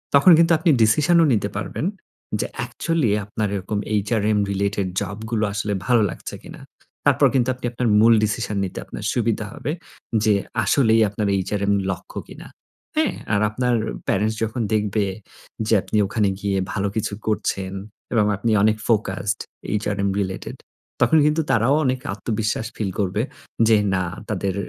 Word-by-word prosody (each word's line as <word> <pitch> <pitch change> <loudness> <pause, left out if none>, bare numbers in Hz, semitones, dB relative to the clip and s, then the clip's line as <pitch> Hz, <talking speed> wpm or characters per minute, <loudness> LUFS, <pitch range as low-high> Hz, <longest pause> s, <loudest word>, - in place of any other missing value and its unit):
তখন 140 +6 +7
কিন্তু 170 0 +4
আপনি 165 +1 +2
ডিসিশনও 155 +10 +4
নিতে 100 -2 0
পারবেন। 125 +9 -3 0.6
যে - - -2
অ্যাকচুয়ালি 125 +1 -1
আপনার 105 0 -2
এরকম 100 +2 -2
এইচআরএম 105 0 +1
রিলেটেড 100 0 -1
জব 100 0 -4
গুলো 110 -2 +1
আসলে 105 0 -2
ভালো 120 -2 +4
লাগছে - - -7
কিনা। - - -11 0.4
তারপর - - +5
কিন্তু 130 0 +2
আপনি 125 - -7
আপনার 120 0 -1
মূল 115 +1 +6
ডিসিশন 105 0 -1
নিতে 95 - -4
আপনার - - -8
সুবিধা 115 -2 0
হবে। 145 - -4 0.5
যে 110 - +4 0.3
আসলেই 115 -5 +4
আপনার 105 +1 -2
এইচআরএম 100 +1 0 0.2
লক্ষ্য 90 - -6
কিনা। - - -11 0.5
হ্যাঁ? - - +2 0.2
আর 105 - +2
আপনার 125 +2 0 0.3
প্যারেন্টস 110 +3 +1
যখন 115 +2 -2
দেখবে 105 0 +1 0.6
যে 110 - +2
আপনি 110 - -2
ওখানে 105 -1 +1
গিয়ে 100 -1 -1 0.2
ভালো 100 -1 0
কিছু 110 -2 -1
করছেন 95 -3 -1 0.4
এবং 110 -3 +3
আপনি 115 +3 0
অনেক 110 0 +3
ফোকাসড 100 -3 0 0.3
এইচআরএম 100 -1 0
রিলেটেড। 95 -1 -4 0.4
তখন 160 - +5
কিন্তু 150 +2 +2
তারাও 115 +5 +3
অনেক 130 0 +1
আত্মবিশ্বাস 110 +1 -2
ফিল 100 -3 -2
করবে। 100 +1 0 0.5
যে 110 -1 +6 0.2
না, 95 - +1 0.3
তাদের 100 -2 -1
105 Hz, 155 wpm, -22 LUFS, 100-115 Hz, 0.6 s, তখন